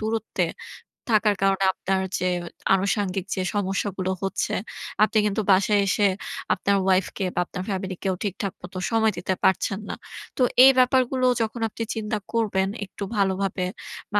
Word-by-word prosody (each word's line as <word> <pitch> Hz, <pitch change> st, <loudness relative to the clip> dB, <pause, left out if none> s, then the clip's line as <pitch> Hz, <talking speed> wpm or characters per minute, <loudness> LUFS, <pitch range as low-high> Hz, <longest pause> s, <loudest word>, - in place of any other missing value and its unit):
দূরত্বে 220 Hz, 0 st, -1 dB, 0.7 s
থাকার 210 Hz, -1 st, +4 dB
কারণে 195 Hz, 0 st, +3 dB
আপনার 190 Hz, 0 st, -1 dB, 0.2 s
যে 185 Hz, 0 st, +1 dB, 0.4 s
আনুষঙ্গিক 195 Hz, -1 st, 0 dB
যে 190 Hz, -, -1 dB
সমস্যাগুলো 195 Hz, -1 st, -1 dB
হচ্ছে, 195 Hz, -, -1 dB, 0.5 s
আপনি 215 Hz, +1 st, +2 dB
কিন্তু 210 Hz, +1 st, 0 dB
বাসায় 200 Hz, +2 st, +4 dB
এসে 205 Hz, +2 st, +3 dB, 0.5 s
আপনার 200 Hz, -, +1 dB
ওয়াইফ 190 Hz, -1 st, +3 dB
কে 195 Hz, -, -1 dB
বা -, -, +1 dB
আপনার 180 Hz, -, -6 dB
ফ্যামিলিকেও 190 Hz, -1 st, -2 dB
ঠিকঠাক 195 Hz, -1 st, -3 dB
মত -, -, -10 dB, 0.2 s
সময় 220 Hz, -1 st, +3 dB
দিতে 180 Hz, +2 st, -1 dB
পারছেন 190 Hz, +1 st, +2 dB
না। -, -, -3 dB, 0.4 s
তো -, -, -1 dB, 0.2 s
এই 270 Hz, -, +9 dB
ব্যাপারগুলো 255 Hz, 0 st, +3 dB, 0.2 s
যখন 225 Hz, +1 st, -2 dB
আপনি 230 Hz, -, -5 dB
চিন্তা 215 Hz, -1 st, -2 dB, 0.2 s
করবেন, 200 Hz, -4 st, +1 dB, 0.2 s
একটু 200 Hz, -, -8 dB
ভালোভাবে 190 Hz, -1 st, 0 dB, 0.5 s
বা 205 Hz, -, +4 dB
200 Hz, 150 wpm, -24 LUFS, 190-215 Hz, 0.7 s, এই